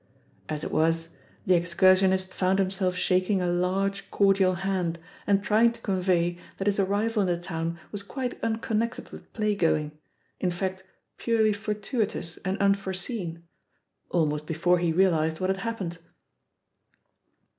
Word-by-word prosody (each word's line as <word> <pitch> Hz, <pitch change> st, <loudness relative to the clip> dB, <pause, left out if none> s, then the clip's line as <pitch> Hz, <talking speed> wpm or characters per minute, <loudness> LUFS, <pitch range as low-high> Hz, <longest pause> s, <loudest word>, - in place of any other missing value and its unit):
As 155 Hz, -1 st, -3 dB
it -, -, -4 dB
was, 165 Hz, +1 st, +1 dB, 0.4 s
the 185 Hz, -, +4 dB
ex 170 Hz, 0 st, +1 dB
cursionist 185 Hz, 0 st, +4 dB
found 190 Hz, +1 st, +1 dB
himself 190 Hz, -1 st, 0 dB
shaking 185 Hz, +2 st, +1 dB
a 180 Hz, -, 0 dB
large 185 Hz, +3 st, 0 dB
cordial 195 Hz, -2 st, +3 dB
hand, 180 Hz, -2 st, -1 dB, 0.3 s
and 200 Hz, -1 st, +3 dB
trying 225 Hz, +3 st, +4 dB
to 230 Hz, -, -16 dB
convey 180 Hz, -3 st, +1 dB, 0.2 s
that 195 Hz, -, -3 dB
his 205 Hz, 0 st, +1 dB
arrival 205 Hz, +3 st, +1 dB
in 190 Hz, -, +1 dB
the 175 Hz, -1 st, +1 dB
town 170 Hz, -1 st, -4 dB
was 205 Hz, -, -4 dB
quite 250 Hz, +5 st, -5 dB
unconnected 225 Hz, 0 st, -1 dB
with -, -, -12 dB
play 215 Hz, -2 st, +1 dB
going, 155 Hz, -5 st, +1 dB, 0.5 s
in 185 Hz, -, +1 dB
fact 185 Hz, +1 st, -3 dB, 0.3 s
purely 220 Hz, -2 st, +2 dB
fortuitous 210 Hz, -3 st, -3 dB
and 190 Hz, +1 st, -3 dB
unforeseen, 190 Hz, -3 st, -1 dB, 0.7 s
almost 150 Hz, -3 st, 0 dB
before 175 Hz, +2 st, +2 dB
he 170 Hz, -1 st, +1 dB
realised 160 Hz, -3 st, +2 dB
what 185 Hz, +1 st, +1 dB
had 190 Hz, -, -2 dB
happened. 195 Hz, -5 st, -4 dB
190 Hz, 145 wpm, -27 LUFS, 175-200 Hz, 0.7 s, the